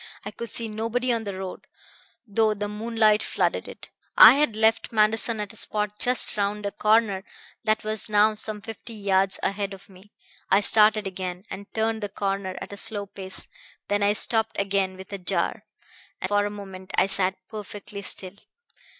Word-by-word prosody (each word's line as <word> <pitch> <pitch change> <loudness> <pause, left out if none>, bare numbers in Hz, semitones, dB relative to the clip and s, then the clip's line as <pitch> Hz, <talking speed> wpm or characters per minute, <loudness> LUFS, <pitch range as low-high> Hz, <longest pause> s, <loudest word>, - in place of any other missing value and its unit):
I 205 - -5
could 235 +2 -6
see 230 +2 0
nobody 230 +3 -1
on 225 -1 -2
the 200 -2 -5
road, 190 -1 -7 0.6
though 215 0 +1
the 205 0 -3
moonlight 215 0 +2
flooded - - -1
it. - - -10 0.3
I - - +11
had 285 -5 +1
left 220 +1 +2
Manderson 220 +1 +2
at 210 0 -4
a - - -3
spot 210 -1 -1
just 250 0 +3
round 205 +1 -1
a 200 - -1
corner 210 -3 +2 0.4
that 215 0 +1
was 215 0 -2
now 210 +1 +4
some 215 0 0
fifty 225 +2 -9
yards 195 -2 +1
ahead 200 0 -2
of 195 +1 -18
me. 190 +2 -18 0.4
I 195 - +5
started 215 0 +4
again, 185 -1 -5
and 200 +1 -8
turned 220 0 0
the 205 - -3
corner 195 -1 -3
at - - -8
a - - -8
slow 205 0 0
pace. 190 -1 -6 0.4
Then 205 0 +1
I 205 +1 +3
stopped 220 +1 0
again 195 -1 0
with 190 +1 -11
a 200 - -4
jar, 185 +4 -1 0.5
and 185 - -2
for 205 0 +2
a - - -4
moment 195 -2 -9
I - - +4
sat 190 -1 0
perfectly 205 -1 -7
still. 190 0 -1
205 Hz, 185 wpm, -25 LUFS, 195-220 Hz, 0.6 s, I